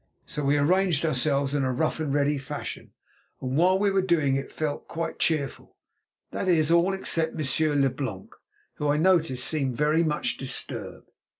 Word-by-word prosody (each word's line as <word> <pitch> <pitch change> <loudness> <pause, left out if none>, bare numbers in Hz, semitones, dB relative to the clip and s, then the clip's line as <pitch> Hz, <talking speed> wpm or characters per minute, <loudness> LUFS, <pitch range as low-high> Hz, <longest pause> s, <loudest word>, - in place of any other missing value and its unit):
So 150 - -5
we 140 +1 +2
arranged 170 +1 +2
ourselves 140 -1 +1
in 145 -2 +1
a 130 - 0
rough 155 +6 -1
and 155 -3 -2
ready 145 0 +1
fashion, 135 - -7 0.5
and 130 0 -3
while 180 +4 +4
we 200 0 +1
were 195 0 +2
doing 160 -7 +1
it 135 0 -4
felt 150 -2 -4
quite 165 0 -4
cheerful—that 155 +4 -4
is, 165 -3 +3
all 170 +3 +4
except 165 -4 0
Monsieur 155 +1 +1
Leblanc, 130 -8 -2 0.4
who, 150 - -2
I 145 +1 +2
noticed, 160 -7 +2
seemed 135 -3 -1
very 150 +2 +2
much 150 -2 -1
disturbed. 135 -1 -4
150 Hz, 165 wpm, -26 LUFS, 135-165 Hz, 0.5 s, while